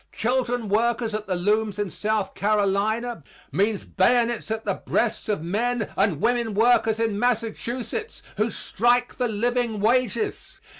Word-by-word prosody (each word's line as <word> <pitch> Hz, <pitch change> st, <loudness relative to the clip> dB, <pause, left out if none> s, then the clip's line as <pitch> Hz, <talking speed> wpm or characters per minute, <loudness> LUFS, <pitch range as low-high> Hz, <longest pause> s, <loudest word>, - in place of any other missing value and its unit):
Children 245 Hz, 0 st, 0 dB
workers 225 Hz, +2 st, +1 dB
at 215 Hz, 0 st, -4 dB
the 185 Hz, -, 0 dB
looms 210 Hz, +3 st, +1 dB
in 205 Hz, -3 st, -2 dB
South 215 Hz, -2 st, -1 dB
Carolina 210 Hz, +2 st, 0 dB, 0.3 s
means 205 Hz, +1 st, 0 dB
bayonets 235 Hz, +3 st, +2 dB
at 220 Hz, 0 st, -3 dB
the -, -, +1 dB
breasts -, -, -1 dB
of 200 Hz, -7 st, -1 dB
men 220 Hz, +5 st, -1 dB
and 195 Hz, -6 st, +1 dB
women 235 Hz, -1 st, +1 dB
workers 225 Hz, 0 st, +3 dB
in 225 Hz, -3 st, 0 dB
Massachusetts 245 Hz, -, -2 dB
who 215 Hz, +3 st, +1 dB
strike 240 Hz, +4 st, +1 dB
for 250 Hz, -, -1 dB
living 235 Hz, 0 st, 0 dB
wages. 255 Hz, -, 0 dB
225 Hz, 140 wpm, -24 LUFS, 210-240 Hz, 0.3 s, workers